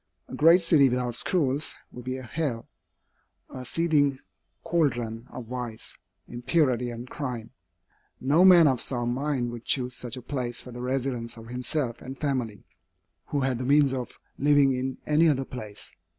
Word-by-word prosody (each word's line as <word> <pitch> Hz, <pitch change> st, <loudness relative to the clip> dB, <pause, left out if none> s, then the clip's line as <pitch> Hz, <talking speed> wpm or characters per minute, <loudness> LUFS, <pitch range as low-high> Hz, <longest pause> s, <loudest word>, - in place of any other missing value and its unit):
A -, -, -12 dB
great 170 Hz, +3 st, +6 dB
city 150 Hz, -5 st, +5 dB
without 125 Hz, -1 st, -1 dB
schools 145 Hz, +1 st, 0 dB, 0.2 s
would 125 Hz, 0 st, -10 dB
be 130 Hz, +1 st, -3 dB
a 130 Hz, -, -8 dB
hell, 125 Hz, -2 st, -3 dB, 0.8 s
a 130 Hz, -, -7 dB
seething 145 Hz, -1 st, +2 dB, 0.5 s
caldron 120 Hz, -8 st, -1 dB
of 125 Hz, -, -8 dB
vice, 120 Hz, -2 st, -5 dB, 0.3 s
impurity, 125 Hz, -1 st, +1 dB
and 120 Hz, +1 st, -7 dB
crime. 125 Hz, -5 st, -5 dB, 0.7 s
No 145 Hz, +7 st, +4 dB
man 180 Hz, -3 st, +8 dB
of 130 Hz, -4 st, +2 dB
sound 120 Hz, -2 st, -1 dB
mind 130 Hz, -3 st, -1 dB
would 120 Hz, -1 st, -8 dB
choose 125 Hz, -1 st, -1 dB
such 120 Hz, 0 st, -6 dB
a 125 Hz, -, -8 dB
place 125 Hz, -3 st, -3 dB
for 125 Hz, -, -8 dB
the 120 Hz, 0 st, -7 dB
residence 125 Hz, -2 st, -2 dB
of 115 Hz, 0 st, -11 dB
himself 125 Hz, 0 st, -2 dB
and 135 Hz, +1 st, -8 dB
family, 125 Hz, -8 st, -2 dB, 0.6 s
who 145 Hz, -, -1 dB
had 130 Hz, -2 st, 0 dB
the -, -, -3 dB
means 140 Hz, -1 st, +4 dB
of 125 Hz, -2 st, -5 dB, 0.2 s
living 145 Hz, -1 st, +5 dB
in 130 Hz, 0 st, -3 dB
any 155 Hz, +2 st, +4 dB
other 135 Hz, -2 st, +1 dB
place. 105 Hz, -5 st, -7 dB
130 Hz, 165 wpm, -27 LUFS, 120-145 Hz, 0.8 s, man